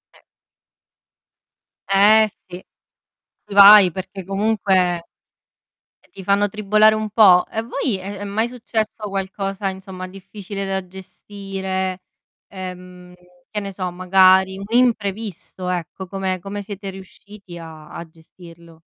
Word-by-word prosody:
E -, -, -22 dB, 1.7 s
Eh, 210 Hz, +2 st, +5 dB, 0.2 s
sì. 180 Hz, 0 st, -10 dB, 0.9 s
Vai, 200 Hz, -2 st, +9 dB
perché 190 Hz, +2 st, -7 dB
comunque, 195 Hz, -3 st, 0 dB, 1.0 s
ti 195 Hz, -, -11 dB
fanno 200 Hz, +1 st, +2 dB
tribolare 215 Hz, +1 st, +3 dB
un 215 Hz, -1 st, -3 dB
po'. 195 Hz, -5 st, +6 dB
A 220 Hz, 0 st, -4 dB
voi 240 Hz, -2 st, -2 dB
è 195 Hz, +1 st, -7 dB
è 205 Hz, -, -6 dB
mai 215 Hz, +4 st, -1 dB
successo 220 Hz, -3 st, -4 dB
qualcosa, 195 Hz, 0 st, -3 dB
insomma, 190 Hz, -1 st, -8 dB
difficile 195 Hz, +1 st, -8 dB
da 190 Hz, -1 st, -3 dB
gestire, 190 Hz, 0 st, -6 dB, 0.5 s
ehm, 180 Hz, -1 st, -10 dB, 0.4 s
che 210 Hz, -, -3 dB
ne 200 Hz, -1 st, -6 dB
so 185 Hz, -1 st, -4 dB
magari 190 Hz, +1 st, +4 dB
un 195 Hz, -, -7 dB
imprevisto 210 Hz, -6 st, -1 dB
ecco, 180 Hz, +1 st, -4 dB
come 190 Hz, 0 st, -3 dB
come 200 Hz, +2 st, -6 dB
siete 200 Hz, -1 st, -7 dB
riusciti 190 Hz, -1 st, -13 dB
a 160 Hz, -2 st, -11 dB
a 170 Hz, -1 st, -8 dB
gestirlo? 165 Hz, 0 st, -17 dB
195 Hz, 120 wpm, -20 LUFS, 185-205 Hz, 1.7 s, Vai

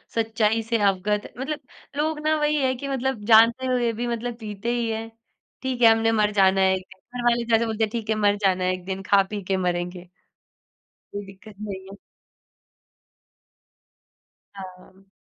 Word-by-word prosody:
सच्चाई 225 Hz, 0 st, +1 dB
से 230 Hz, +1 st, 0 dB
अवगत 200 Hz, +1 st, 0 dB
मतलब 295 Hz, +3 st, -3 dB, 0.4 s
लोग 305 Hz, +1 st, 0 dB
ना 310 Hz, -, +3 dB
वही 300 Hz, 0 st, +1 dB
है 260 Hz, 0 st, +2 dB
कि 275 Hz, +3 st, -6 dB
मतलब 265 Hz, -5 st, -2 dB
जानते 230 Hz, +3 st, +5 dB
हुए 245 Hz, -2 st, +1 dB
भी 240 Hz, +2 st, -3 dB
मतलब 240 Hz, 0 st, -3 dB
पीते 215 Hz, +1 st, -4 dB
ही 235 Hz, -1 st, -1 dB
हैं। 225 Hz, 0 st, -4 dB, 0.5 s
ठीक 260 Hz, -2 st, -3 dB
है 230 Hz, -, +8 dB
हमने 225 Hz, 0 st, +2 dB
मर 210 Hz, -2 st, +2 dB
जाना 195 Hz, -1 st, +4 dB
है 190 Hz, 0 st, +4 dB
एक 185 Hz, -, -6 dB
दिन, 190 Hz, -, -36 dB, 0.2 s
घरवाले 240 Hz, 0 st, +2 dB
जैसे 225 Hz, +1 st, +4 dB
बोलते 220 Hz, 0 st, -1 dB
हैं, 220 Hz, -, +1 dB
"ठीक 225 Hz, -2 st, -4 dB
है, 220 Hz, -, +2 dB
मर 205 Hz, -1 st, +2 dB
जाना 185 Hz, -1 st, +2 dB
एक 185 Hz, -1 st, -3 dB
दिन, 190 Hz, 0 st, -4 dB
खा-पी 200 Hz, +1 st, +2 dB
के 190 Hz, +1 st, -1 dB
मरेंगे।" 180 Hz, 0 st, -3 dB, 1.0 s
कोई 205 Hz, 0 st, -5 dB
दिक्कत 195 Hz, +2 st, -14 dB
नहीं 195 Hz, -3 st, -6 dB
है। 200 Hz, -, -11 dB, 2.6 s
हाँ। 190 Hz, 0 st, -12 dB
220 Hz, 170 wpm, -24 LUFS, 195-235 Hz, 2.6 s, है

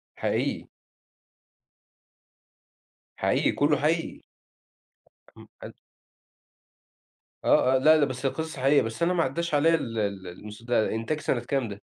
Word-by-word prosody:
حقيقي. -, -, -2 dB, 2.5 s
حقيقي -, -, +1 dB
كلّه، 145 Hz, 0 st, +2 dB
حقيقي. 165 Hz, +3 st, -1 dB, 1.2 s
اهم. -, -, -14 dB
حلو. -, -, -9 dB, 1.7 s
آه، 130 Hz, -, +3 dB
آه، -, -, +5 dB
لأ، 155 Hz, +4 st, +5 dB
لأ 150 Hz, -, +3 dB
بس 130 Hz, 0 st, -6 dB
هي 135 Hz, -, +2 dB
قصص 160 Hz, 0 st, -5 dB
حقيقية، 135 Hz, +2 st, +3 dB
بس 115 Hz, +9 st, -4 dB
أنا 180 Hz, -, +2 dB
ما 170 Hz, -2 st, +2 dB
عدّاش 170 Hz, +4 st, -3 dB
عليّا 160 Hz, +3 st, +4 dB
ال 115 Hz, -8 st, -3 dB
ال 100 Hz, -3 st, -3 dB
المس 105 Hz, +5 st, -11 dB
ده 120 Hz, -2 st, 0 dB
إنتاج 130 Hz, +7 st, -2 dB
سَنة 130 Hz, -, -1 dB
كام 125 Hz, 0 st, -2 dB
ده؟ 100 Hz, 0 st, -9 dB
135 Hz, 135 wpm, -26 LUFS, 115-155 Hz, 2.5 s, آه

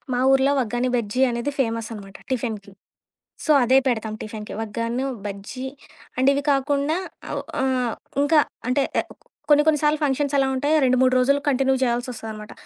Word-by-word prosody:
మా 245 Hz, -, 0 dB
ఊరిలో 270 Hz, +1 st, +4 dB
ఒగ్గాని 240 Hz, +2 st, -1 dB
బజ్జీ 235 Hz, +2 st, -2 dB
అనేది 235 Hz, +4 st, -2 dB
ఫేమస్ 230 Hz, -2 st, -2 dB
అనమాట 195 Hz, -2 st, -10 dB
టిఫిన్‌కి. 225 Hz, -5 st, -3 dB, 0.7 s
సో, 310 Hz, -, +3 dB
అదే 255 Hz, +2 st, +4 dB
పెడతాం 220 Hz, -4 st, -1 dB
టిఫిన్‌కి, 215 Hz, 0 st, -7 dB
ఒగ్గాను 230 Hz, +4 st, -3 dB, 0.2 s
బజ్జీ, 205 Hz, +6 st, -6 dB, 0.5 s
అండ్ 260 Hz, +1 st, +2 dB
ఇవి 280 Hz, -, 0 dB
కాకుండా 285 Hz, +3 st, +1 dB, 0.3 s
అవ్ -, -, -2 dB, 0.2 s
ఆహ్, 255 Hz, -3 st, 0 dB, 0.3 s
ఇంకా, 300 Hz, +2 st, +4 dB, 0.3 s
అంటే, 255 Hz, +3 st, +2 dB, 0.2 s
ఎవ్ -, -, -3 dB, 0.4 s
కొన్ని 295 Hz, 0 st, +6 dB
కొన్ని 305 Hz, -2 st, +4 dB
సార్లు 300 Hz, 0 st, +2 dB
ఫంక్షన్స్ 285 Hz, 0 st, 0 dB
ఎలా 270 Hz, -1 st, +3 dB
ఉంటాయో 290 Hz, +4 st, +1 dB
2,3 255 Hz, 0 st, +3 dB
రోజులు 280 Hz, +3 st, +3 dB
కంటిన్యూ 265 Hz, -1 st, +2 dB
చేయాల్సిసొస్తదనమాట. 230 Hz, -3 st, -3 dB
255 Hz, 150 wpm, -23 LUFS, 225-275 Hz, 0.7 s, కొన్ని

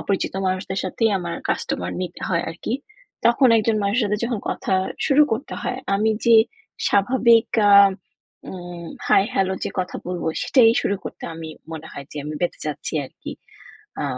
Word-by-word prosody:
অপরিচিত 195 Hz, -1 st, -2 dB
মানুষদের 185 Hz, +1 st, -2 dB
সাথেই 220 Hz, +4 st, +1 dB
আমার 170 Hz, -1 st, -4 dB, 0.2 s
কাস্টমার 90 Hz, 0 st, -2 dB
নিতে 175 Hz, -1 st, -6 dB
হয় 170 Hz, -2 st, +1 dB
আরকি। 180 Hz, +8 st, -4 dB, 0.5 s
তখন 245 Hz, +2 st, +5 dB
একজন 220 Hz, 0 st, +1 dB
মানুষের 215 Hz, +5 st, +1 dB
সাথে 210 Hz, +1 st, -1 dB
যখন 235 Hz, -4 st, -2 dB
কথা -, -, -1 dB, 0.3 s
শুরু 295 Hz, +1 st, +5 dB
করতে 250 Hz, +7 st, -3 dB
হয় 250 Hz, -, -2 dB, 0.2 s
আমি 220 Hz, +2 st, +2 dB, 0.2 s
যে 230 Hz, -1 st, +7 dB, 0.5 s
স্বাভাবিক 230 Hz, +2 st, +4 dB, 0.2 s
আ -, -, +7 dB, 0.8 s
উ -, -, -7 dB, 0.6 s
হাই-হ্যালো 195 Hz, -1 st, +2 dB
যে -, -, -3 dB
কথা 180 Hz, -, -4 dB
বলব 180 Hz, -2 st, -4 dB, 0.2 s
সেটাই 230 Hz, -4 st, +5 dB
শুরু 200 Hz, -, 0 dB
করতে -, -, -8 dB
আমি 160 Hz, -1 st, -7 dB, 0.2 s
মনে 160 Hz, 0 st, -7 dB
হয় 140 Hz, -1 st, -8 dB
যে -, -, -10 dB
আমি 150 Hz, 0 st, -5 dB
বেঁজে 175 Hz, -, -2 dB
যাচ্ছি 150 Hz, 0 st, -4 dB
আরকি। -, -, -9 dB, 0.7 s
আ -, -, -2 dB
200 Hz, 160 wpm, -22 LUFS, 175-230 Hz, 0.8 s, যে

